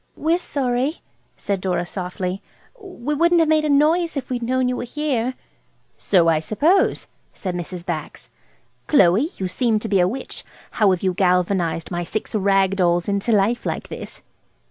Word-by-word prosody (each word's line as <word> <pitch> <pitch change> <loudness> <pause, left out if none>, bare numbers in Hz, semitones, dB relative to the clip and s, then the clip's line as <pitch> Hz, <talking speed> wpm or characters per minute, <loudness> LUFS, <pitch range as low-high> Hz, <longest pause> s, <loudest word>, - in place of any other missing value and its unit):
"We're 330 +3 +1
sorry," 265 -1 -1 0.3
said 200 -2 -3
Dora, 180 -2 -1
softly; 180 +1 -4 0.4
"we 300 - -5
wouldn't 340 +3 +3
have 325 - +3
made 310 0 +3
a - - 0
noise 310 +3 +2
if 265 - -5
we'd 245 -1 -2
known 255 +2 0
you 250 - 0
were - - -4
here." 255 -2 -2 0.6
"So 175 -4 +2
I 160 -2 +3
suppose," 300 - +2 0.3
said 185 -2 -4
Mrs. 175 0 -6
Bax. 155 -4 -6 0.6
"Chloe, 220 - +4
you 190 - -2
seem 225 +4 +1
to 215 - -4
be 200 -3 +2
a 180 - +4
witch. 260 +7 -6 0.3
How 210 -3 +3
have 185 -1 0
you 185 -1 +1
galvanised 180 -2 0
my 175 0 -2
six 215 +5 -4
rag 195 -2 +2
dolls 175 -2 +2
into 200 +3 0
life 215 +3 +2
like - - -4
this?" - - -9
210 Hz, 170 wpm, -21 LUFS, 180-275 Hz, 0.6 s, Chloe